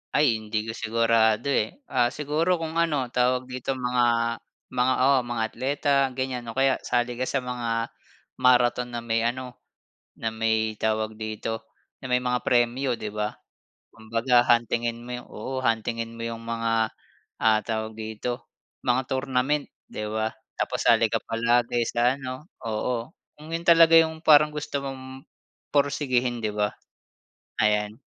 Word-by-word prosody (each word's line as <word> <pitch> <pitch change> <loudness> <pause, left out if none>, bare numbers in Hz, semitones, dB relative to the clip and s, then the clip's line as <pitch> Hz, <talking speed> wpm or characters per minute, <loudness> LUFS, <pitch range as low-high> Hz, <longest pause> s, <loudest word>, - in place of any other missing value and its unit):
Ay, 140 -7 +4
hindi 110 0 -2
ko 115 - -4
sigurado, 115 +2 +2
eh. 140 - -1
Ah, 125 -2 +3
siguro 150 +6 0
kung 165 0 -3
ano 145 -7 0
tawag 125 +1 +2
dito 130 +1 -4
mga, 120 -2 +1 0.3
mga, 125 +1 +2
oo 135 0 +5
mga 120 -1 -2
atleta 140 +5 -1 0.2
ganyan 130 -2 -3
o 115 - -6
kaya 135 0 +3
sali 120 0 -1
ka 130 - -1
sa 135 -2 -1
mga 115 -2 -2 0.5
marathon 125 -1 +4
na 120 - -3
may 115 0 0
ano, 125 0 -5 0.6
na 115 - 0
may 110 -1 0
tawag 110 0 -1
dito 110 +1 -4 0.3
na - - -11
may 125 - +3
mga 125 0 -1
premyo, 120 +2 +2
'di 110 - -4
ba. 105 0 -3 0.6
Kumbaga 115 +2 +2
huntingin 120 -1 +1
mo - - -9
yung 125 - -8
oo, 130 +4 -5
huntingin 115 0 -1
mo - - -5
yung 115 0 -5
mga, 115 -1 0 0.5
ah, 110 -1 +4
tawag 110 -1 -3
dito 110 +3 -4 0.4
mga 125 +1 +1
tournament, 130 +2 0 0.2
'di 105 - -5
ba. 110 +1 -1 0.2
Tapos - - -2
sali 115 -1 +5
ka - - +1
palagi 120 +1 +1
sa 120 +2 +2
ano 130 +2 -7 0.2
oo. 115 +3 -2 0.2
Kung 155 +2 -13
'yon 165 +1 -3
talaga 165 -1 +7
yung 160 -1 +3
parang 150 -1 +6
gusto 145 -2 -3
mong 130 0 -8 0.5
porsigihin, 130 -5 +1
'di 105 - -1
ba? 105 0 +1 0.9
Ayan. 105 0 +1
120 Hz, 150 wpm, -26 LUFS, 115-130 Hz, 0.9 s, talaga